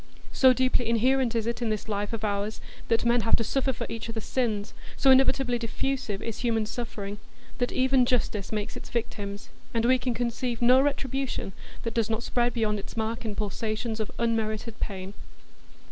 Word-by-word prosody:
So 260 -1 +6
deeply 255 -2 +2
inherent 245 +1 +3
is 225 -1 +1
it 235 +1 -2
in 235 - 0
this 215 0 -2
life 205 -1 -2
of 225 -2 -4
ours 205 +1 -1 0.3
that 230 0 +2
men 235 0 +4
have 225 - +4
to 230 - 0
suffer 265 +4 +1
for 250 - -4
each 230 0 -5
other's 225 -1 -4
sins, 220 -5 -1 0.2
so 270 - +6
inevitably 260 -2 +4
diffusive 235 -2 -2
is 230 -2 -4
human 225 -3 +1
suffering, 210 -3 -5 0.4
that 245 - +1
even 260 -1 +3
justice 220 -5 0
makes 210 -1 -2
its - - -8
victims, 205 -3 -4 0.3
and 230 0 +2
we 255 +1 +5
can 250 -2 -1
conceive 240 0 -1
no 250 +2 +6
retribution 270 -6 -1 0.3
that 230 - -2
does 230 -2 +1
not 225 +1 -1
spread 240 0 +1
beyond 215 -2 +1
its 200 - -9
mark 225 +1 -2
in 210 -2 -3
pulsations 215 +2 -2
of 215 - -2
unmerited 225 -1 -1
pain. 190 -1 -4
230 Hz, 185 wpm, -27 LUFS, 215-245 Hz, 0.4 s, So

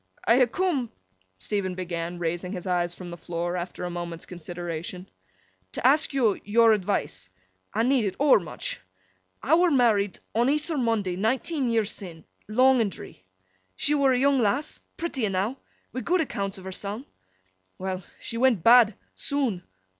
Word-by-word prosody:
'I 230 +3 +5
ha' 240 - -15
coom,' 320 -11 0 0.5
Stephen 185 - -2
began, 175 -1 -4
raising 175 +2 -3
his 180 -3 -6
eyes 175 -1 0
from 180 -2 -8
the 170 - -7
floor, 175 +1 -3
after 180 0 -5
a 180 - -2
moment's 170 -1 -5
consideration, 175 +1 -6 0.7
'to - - -4
ask 295 +5 +4
yo 250 -7 +3
yor 225 +2 +5
advice. 185 - -2 0.4
I 225 - +1
need 245 -4 +2
't - - -20
overmuch. 255 - +2 0.6
I 285 - +2
were 350 +2 +5
married 220 - +3 0.2
on 235 +3 +2
Eas'r 300 +1 0
Monday 210 -6 0
nineteen 255 - 0
year 225 -2 +2
sin, 180 -6 -6 0.2
long 255 +3 +4
and 205 -3 0
dree. 95 - -11 0.5
She 295 - +1
were 280 -2 +4
a 255 - +3
young 275 +1 +3
lass—pretty 275 +4 -2
enow—wi' 210 +6 -4
good 360 +4 +2
accounts 200 -10 -3
of 190 - -11
herseln. 200 +6 -5 0.7
Well! 185 0 -3 0.2
She 230 - -6
went 235 -8 +3
bad—soon. 235 0 +3
210 Hz, 150 wpm, -26 LUFS, 180-260 Hz, 0.7 s, I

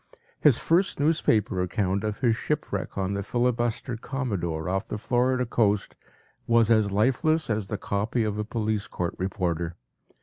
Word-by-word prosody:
His 140 -6 +5
first 175 +1 +1
newspaper 115 - +2
account 95 +1 0
of 105 -1 -3
his 120 -4 +3
shipwreck 110 -8 -3
on 95 0 -1
the 100 - -2
filibuster 120 +1 -1
“Commodore” 100 - -3
off 95 +3 -1
the - - -4
Florida 125 +3 +1
coast 105 -4 +1 0.5
was 115 -1 +4
as 110 -3 +3
lifeless 135 - +2
as 105 -2 -1
the 105 - -3
“copy” 105 +5 -1
of 105 -1 -2
a - - 0
police 110 -1 -2
court 85 -1 -3
reporter. 85 -3 -2
110 Hz, 155 wpm, -26 LUFS, 100-125 Hz, 0.5 s, His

